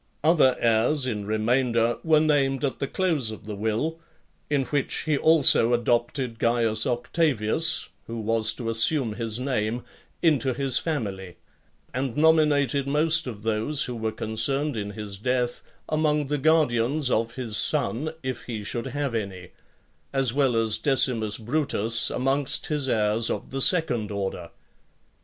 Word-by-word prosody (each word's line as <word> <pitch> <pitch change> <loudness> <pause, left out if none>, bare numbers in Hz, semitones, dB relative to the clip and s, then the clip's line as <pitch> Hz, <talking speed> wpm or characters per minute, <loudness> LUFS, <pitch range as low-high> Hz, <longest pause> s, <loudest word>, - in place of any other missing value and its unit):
Other 155 -5 +4
heirs 120 +5 +2
[in 105 -5 -4
remainder] 115 +1 +1
were 160 -2 +4
named 140 -3 +1
at 135 - -3
the 140 - -2
close 160 -9 0
of 110 - -9
the 105 -1 -6
will, 110 +11 -2 0.5
in 145 -2 +1
which 145 0 -1
he 155 -2 0
also 140 -6 +4
adopted 120 +1 -1
Caius 115 -2 +2
Octavius, 125 +2 +1 0.2
who 115 0 -5
was 110 0 0
to 115 -3 -4
assume 115 +1 +2
his 115 0 -3
name, 120 -3 -2 0.4
into 140 -6 +2
his 135 -1 +1
family; 100 - -4 0.6
and 130 -1 -3
nominated 150 -4 +3
most 155 +2 +1
of 105 -4 -7
those 115 +7 0
who 125 - -5
were 110 -1 -2
concerned 135 +6 -1
in 105 -2 -4
his 100 -2 -8
death 125 +1 -1 0.3
among 150 -1 0
the 150 -1 -1
guardians 145 -3 +2
of 115 +1 -1
his 120 -5 -4
son, 150 +3 0
if 130 -1 -5
he 110 -4 -5
should 120 +5 -4
have 140 -1 -3
any; 95 -5 -5 0.6
as 135 -3 +1
well 135 -3 +1
as 110 -1 +2
Decimus 120 -5 +2
Brutus 115 -3 0
amongst 135 +1 -1
his 145 -3 -2
heirs 110 0 +3
of - - -4
the 135 +1 -2
second 125 - +2
order. 95 -4 -4
125 Hz, 145 wpm, -25 LUFS, 110-145 Hz, 0.6 s, Other